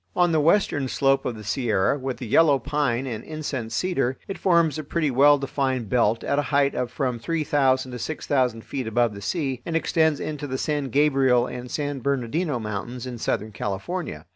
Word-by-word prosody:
On 175 -1 +3
the 160 - +3
western 150 -4 +2
slope 135 +1 +1
of 125 - -2
the 105 - -9
Sierra, 105 0 +1
with 130 -2 -4
the 125 - -6
yellow 145 +5 +4
pine 135 -1 -1
and 115 -4 -5
incense 145 -7 -4
cedar, 135 -8 0
it 195 - -6
forms 170 -5 +3
a - - -4
pretty 155 0 -1
well 145 +3 +6
defined 130 -4 -2
belt 115 -1 +2
at 140 - 0
a 145 - -2
height 140 -1 +3
of 125 - -2
from 125 -4 -2
three 165 +5 -1
thousand 130 -3 +1
to 125 - -6
six 155 +6 -5
thousand 125 -5 +1
feet 130 -4 -4
above 120 0 +1
the 100 - -9
sea, 135 - -2
and 165 - -4
extends 160 -2 +2
into 150 -1 -4
the 130 -1 -3
San 145 0 -1
Gabriel 135 -3 +3
and 125 0 -7
San 145 -1 -3
Bernardino 140 +3 -1
Mountains 115 +3 -5
in 125 -2 -6
Southern 110 -1 -2
California. 100 - -4
135 Hz, 200 wpm, -24 LUFS, 120-150 Hz, -, well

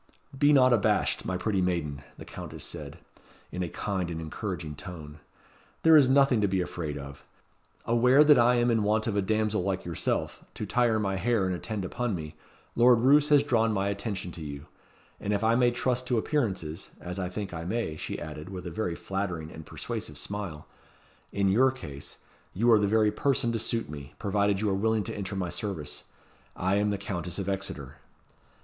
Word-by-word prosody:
"Be 145 +2 +4
not 130 -3 +6
abashed, 115 - +1
my 95 - -1
pretty 95 +1 0
maiden," 80 -6 -1 0.2
the - - -10
Countess - - -8
said, - - -7 0.5
in 90 - -4
a 90 - -2
kind 95 -3 -3
and 80 -1 -4
encouraging 80 -1 -5
tone; 75 -3 -9 0.6
"there 160 0 +7
is 140 -4 +7
nothing 135 -4 +4
to 105 - +3
be 95 -1 0
afraid 80 -4 -3
of. 70 0 -9 0.6
Aware 125 +5 +5
that 150 -4 +6
I 120 +1 +5
am 120 0 +3
in 115 -1 +2
want 105 +1 +1
of 110 - -1
a 100 - +2
damsel 110 0 +1
like 95 0 -2
yourself, 85 -2 -2
to - - -4
tire 120 -3 +2
my 95 -2 -1
hair 115 -1 +1
and 95 - 0
attend 100 +2 -4
upon 120 +3 -2
me, 75 -2 -7 0.4
Lord 120 -1 +6
Roos 145 +4 +5
has 145 -1 +6
drawn 115 -6 +2
my 100 0 0
attention 100 -3 -4
to 85 - -9
you; 70 -1 -7 0.5
and 105 - -2
if 100 +1 0
I 110 +1 +4
may 120 +1 +4
trust 125 +1 -1
to 120 - +1
appearances 100 - -2
as 90 +2 -6
I 90 -1 -2
think 100 0 -5
I 80 -1 -5
may," 95 -3 -2
she - - -5
added, 75 +2 -7
with 95 -2 -7
a 85 - -5
very 90 -1 -2
flattering 90 -5 -4
and 80 -2 -10
persuasive - - -5
smile, 100 -7 -5 0.7
"in 100 -1 +1
your 120 +8 +5
case 75 - -8 0.4
you 115 +5 +3
are 110 - +7
the 105 - +2
very 105 0 +3
person 130 -3 +1
to 115 - -1
suit 115 +1 -1
me, 70 -2 -9
provided 100 0 +1
you 105 - +1
are - - +1
willing 110 +2 +1
to - - -5
enter 100 -1 -4
my 90 -2 -2
service. 85 -7 -4 0.5
I 95 +2 +1
am 105 0 +2
the 100 - -1
Countess 90 -3 -4
of 100 -2 -3
Exeter." 95 -8 -3
100 Hz, 200 wpm, -28 LUFS, 90-115 Hz, 0.7 s, there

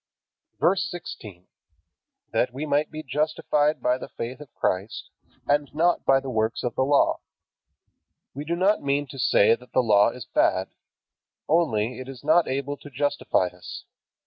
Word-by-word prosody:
VERSE 190 +2 +2
16. 105 - -9 0.9
That 125 - +1
we 135 +5 -5
might 145 0 +1
be 155 0 -7
justified 150 +1 0
by 125 +1 +2
the - - -8
faith 120 +4 -6
of 145 -5 -12
Christ, 95 +4 -2 0.3
and 145 0 +1
not 170 +2 +2
by 135 0 +5
the 135 -1 -6
works 110 0 -1
of 125 - -2
the - - -1
Law. 140 +2 +3 1.1
We 140 - -5
do 165 +3 -2
not 195 +4 +2
mean 140 +1 0
to 135 - -9
say 105 - +4
that 125 +2 -8
the 130 - +3
Law 105 -2 +5
is 120 -1 -9
bad. - - +1 0.8
Only 125 -8 +1
it 130 +1 -8
is 135 -1 -10
not 160 +3 +4
able 140 +2 -3
to 145 - -12
justify 145 -9 0
us. 90 - -9
135 Hz, 165 wpm, -25 LUFS, 120-150 Hz, 1.1 s, by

